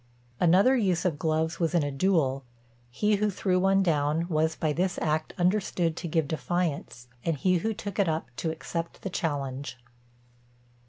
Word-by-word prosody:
Another 190 +10 +5
use 190 -8 +1
of 160 -5 0
gloves 160 +1 0
was 170 0 0
in 165 - +3
a 145 - -2
duel; 135 -4 +1 0.5
he 210 - +1
who 210 +1 +1
threw 185 -1 0
one 195 +1 +3
down 155 0 +1
was 160 -1 +1
by 155 -2 0
this 180 +3 0
act 155 0 -1
understood 180 -3 +1
to - - -4
give 160 -2 0
defiance, 160 -6 -2 0.2
and 165 -3 0
he 185 +5 +2
who 220 +6 -1
took 205 -2 -6
it 195 -4 +3
up 155 -5 -3
to 165 - -1
accept 165 +1 -5
the 195 - -4
challenge. 140 -6 -3
165 Hz, 170 wpm, -27 LUFS, 155-185 Hz, 0.5 s, Another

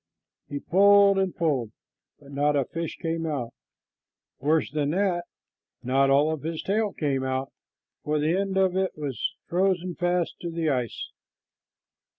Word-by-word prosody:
He 145 - -3
pulled 200 +3 +5
and 190 -2 0
pulled, 145 - 0 0.5
but 140 -1 -15
not 145 +1 +1
a 140 -2 +2
fish 165 +3 -5
came 165 0 -2
out. 135 -7 -3 0.9
Worse 155 +4 +1
than 145 -1 0
that, 175 0 0 0.6
not 135 +2 +3
all 145 +3 +4
of 155 -3 -4
his 160 +1 -4
tail 210 +1 0
came 140 -6 -1
out, 130 0 -2 0.5
for 150 +1 0
the 155 +3 +1
end 195 0 -1
of 190 -1 +3
it 190 -3 -1
was 140 -6 -3
frozen 180 0 0
fast 175 0 -1
to 175 - -4
the 165 -2 0
ice. 125 -4 -3
160 Hz, 155 wpm, -26 LUFS, 140-185 Hz, 0.9 s, pulled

